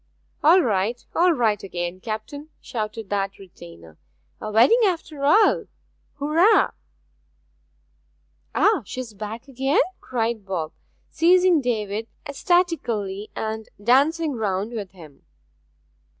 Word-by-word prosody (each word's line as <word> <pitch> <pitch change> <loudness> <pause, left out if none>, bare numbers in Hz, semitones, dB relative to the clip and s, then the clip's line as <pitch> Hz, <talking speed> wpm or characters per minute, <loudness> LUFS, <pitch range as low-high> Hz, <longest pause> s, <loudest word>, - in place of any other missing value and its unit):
'All 345 +5 +6
right 220 +1 -1
all 355 +1 +4
right 225 -9 +1
again, 175 -1 -5
captain!', 225 +9 -6
shouted 215 -2 -5
that 195 -1 -1
retainer. 85 - -14 0.4
'A 215 - -4
wedding 240 - +5
after 330 -7 -1
all! 410 +10 +4 0.5
Hurrah!' 320 +9 +3 1.8
'Ah 420 -6 +3
she's 240 +2 -7
back 215 +5 -7
again?' 270 +1 0 0.2
cried 230 -3 -2
Bob, 175 -5 -3 0.4
seizing 360 -1 +4
David, 220 -3 -2 0.2
ecstatically, 270 - 0
and 220 0 -4
dancing 285 +8 +2
round 210 -2 -2
with 210 -5 -5
him. 155 -7 -15
225 Hz, 105 wpm, -23 LUFS, 200-300 Hz, 1.8 s, All